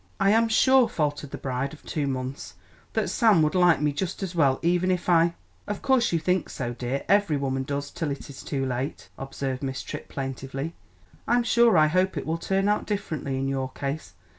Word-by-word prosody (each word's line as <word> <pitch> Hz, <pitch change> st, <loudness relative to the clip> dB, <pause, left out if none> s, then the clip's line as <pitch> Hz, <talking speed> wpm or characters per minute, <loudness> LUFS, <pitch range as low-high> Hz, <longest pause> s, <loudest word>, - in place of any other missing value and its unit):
"I 195 Hz, 0 st, +4 dB
am 225 Hz, +1 st, +3 dB
sure," 260 Hz, +2 st, +5 dB
faltered 145 Hz, -2 st, -2 dB
the -, -, -6 dB
bride 135 Hz, +1 st, -3 dB
of 155 Hz, -, -14 dB
two 145 Hz, -3 st, -2 dB
months, 130 Hz, 0 st, -4 dB, 0.4 s
"that -, -, 0 dB
Sam 215 Hz, -9 st, +4 dB
would 155 Hz, -, +1 dB
like 180 Hz, -4 st, +4 dB
me 150 Hz, -1 st, +2 dB
just 185 Hz, +5 st, -3 dB
as 185 Hz, -2 st, -4 dB
well 140 Hz, -6 st, +3 dB
even 175 Hz, +2 st, +2 dB
if 180 Hz, -1 st, -1 dB
I 170 Hz, -1 st, +4 dB, 0.2 s
" -, -, -35 dB
"Of 205 Hz, -1 st, -4 dB
course 260 Hz, -3 st, +3 dB
you 170 Hz, -, +2 dB
think 180 Hz, +3 st, 0 dB
so, 120 Hz, -2 st, -4 dB
dear, 125 Hz, +3 st, -3 dB
every 200 Hz, -7 st, +3 dB
woman 135 Hz, -1 st, -1 dB
does 140 Hz, +1 st, -4 dB
till 160 Hz, -, -3 dB
it 140 Hz, -, -5 dB
is 140 Hz, -, -10 dB
too 135 Hz, -2 st, -2 dB
late," 130 Hz, +2 st, -4 dB
observed 135 Hz, -1 st, -4 dB
Miss 135 Hz, -1 st, -3 dB
Tripp -, -, -7 dB
plaintively. 135 Hz, +3 st, -5 dB, 0.5 s
"I'm 240 Hz, +1 st, +3 dB
sure 235 Hz, -4 st, +4 dB
I 155 Hz, -, +6 dB
hope 185 Hz, +4 st, +1 dB
it -, -, -3 dB
will 165 Hz, +1 st, -2 dB
turn 195 Hz, +3 st, 0 dB
out 210 Hz, 0 st, +1 dB
differently 160 Hz, -10 st, -3 dB
in 135 Hz, 0 st, -1 dB
your 135 Hz, -1 st, -2 dB
case. 140 Hz, -8 st, -5 dB
155 Hz, 215 wpm, -26 LUFS, 135-185 Hz, 0.5 s, I